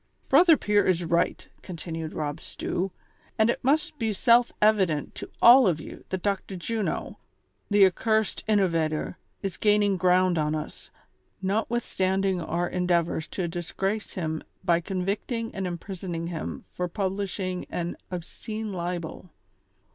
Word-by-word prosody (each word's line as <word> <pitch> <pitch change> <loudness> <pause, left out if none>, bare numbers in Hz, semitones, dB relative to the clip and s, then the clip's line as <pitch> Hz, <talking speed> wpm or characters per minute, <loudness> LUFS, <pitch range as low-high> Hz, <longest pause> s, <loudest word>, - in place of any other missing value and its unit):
"Brother 340 -3 +7
Pier 205 0 +2
is 175 -2 +2
right," 170 +1 0
continued 165 -2 -6
Rob 150 0 -4
Stew, 190 +2 -3 0.5
"and 220 +2 +4
it - - -5
must 295 +2 +1
be 220 -2 0
self 235 +3 +4
evident 190 -8 +2
to - - -8
all 245 0 +9
of 165 -4 +1
you - - -10
that 185 -1 -3
Dr. 200 -1 -1
Juno, 215 +4 -3 0.5
the 205 -1 +6
ac 190 -1 +6
cursed 220 -2 +1
innovator, 165 -7 +1 0.2
is 195 -2 -3
gaining 205 -2 +3
ground 180 -1 +3
on 150 0 0
us, 155 - -6 0.5
notwithstand 195 -2 0
ing 190 -2 +1
our 170 +2 -1
endeavors 175 -3 0
to 180 -3 -3
disgrace 190 +5 -3
him 160 -4 -3 0.2
by 170 -1 +4
convicting 200 +6 -3
and 190 -1 -3
imprisoning 175 -1 -5
him 165 -3 -5
for 180 - -2
publishing 190 0 -3
an 175 0 -3
' - - -43
Obscene 215 +4 -5
Libel.'' 175 0 -4
185 Hz, 140 wpm, -27 LUFS, 170-210 Hz, 0.5 s, all